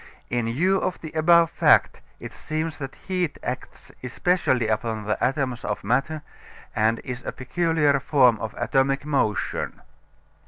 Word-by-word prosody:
In 120 Hz, -1 st, 0 dB
view 180 Hz, +12 st, +2 dB
of 185 Hz, -, -2 dB
the 155 Hz, -, -8 dB
above 165 Hz, +1 st, +4 dB
fact -, -, +3 dB, 0.2 s
it -, -, -8 dB
seems 155 Hz, +1 st, -4 dB
that 135 Hz, -2 st, -7 dB
heat 180 Hz, -4 st, -1 dB
acts 125 Hz, +1 st, -6 dB
especially 130 Hz, -2 st, +1 dB
upon 110 Hz, 0 st, -1 dB
the 105 Hz, -, -1 dB
atoms 130 Hz, -3 st, -1 dB
of 105 Hz, -, -3 dB
matter 140 Hz, +8 st, 0 dB, 0.5 s
and 110 Hz, +1 st, +2 dB
is 125 Hz, -1 st, -6 dB
a -, -, -4 dB
peculiar 150 Hz, +1 st, +1 dB
form 130 Hz, -4 st, +4 dB
of 110 Hz, -1 st, -5 dB
atomic 135 Hz, +1 st, +1 dB
motion. 135 Hz, -8 st, -1 dB
135 Hz, 145 wpm, -24 LUFS, 120-155 Hz, 0.5 s, above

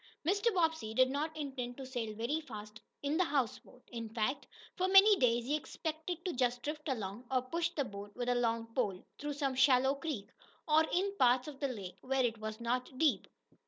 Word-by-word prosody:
Mr. 405 Hz, +5 st, +3 dB
Bobbsey 320 Hz, -10 st, +1 dB
did 255 Hz, +1 st, +5 dB
not 310 Hz, +3 st, -2 dB
intend 265 Hz, -5 st, -4 dB
to 270 Hz, -, -6 dB
sail 235 Hz, -5 st, -4 dB
very 240 Hz, +9 st, -1 dB
fast 215 Hz, -6 st, -9 dB, 0.2 s
in 285 Hz, +2 st, +1 dB
the 370 Hz, -, +4 dB
houseboat. 260 Hz, -4 st, -2 dB
In 230 Hz, -2 st, -5 dB
fact, 225 Hz, +5 st, -1 dB, 0.3 s
for 370 Hz, -, +1 dB
many 390 Hz, +2 st, +8 dB
days, 240 Hz, -4 st, +2 dB
he 290 Hz, +4 st, +1 dB
expected 320 Hz, +3 st, -4 dB
to 360 Hz, -, -1 dB
just 245 Hz, -1 st, 0 dB
drift 300 Hz, 0 st, -4 dB
along, 220 Hz, -1 st, -3 dB
or 255 Hz, -2 st, +1 dB
push 335 Hz, +6 st, -1 dB
the 305 Hz, -5 st, -2 dB
boat 205 Hz, -2 st, -9 dB
with 245 Hz, 0 st, -3 dB
a 245 Hz, -, +3 dB
long 230 Hz, -1 st, +1 dB
pole 205 Hz, -8 st, -1 dB
through 295 Hz, 0 st, -3 dB
some 280 Hz, -2 st, -1 dB
shallow 265 Hz, 0 st, +5 dB
creek, 275 Hz, -9 st, -5 dB, 0.4 s
or 310 Hz, +1 st, +5 dB
in 395 Hz, +3 st, +1 dB
parts 250 Hz, +1 st, +4 dB
of 285 Hz, -3 st, -8 dB
the 280 Hz, -, 0 dB
lake 195 Hz, -7 st, -7 dB
where 265 Hz, 0 st, +1 dB
it 230 Hz, -2 st, -2 dB
was 215 Hz, +1 st, -5 dB
not 250 Hz, +2 st, -2 dB
deep. 310 Hz, 0 st, +2 dB
260 Hz, 200 wpm, -34 LUFS, 235-305 Hz, 0.4 s, many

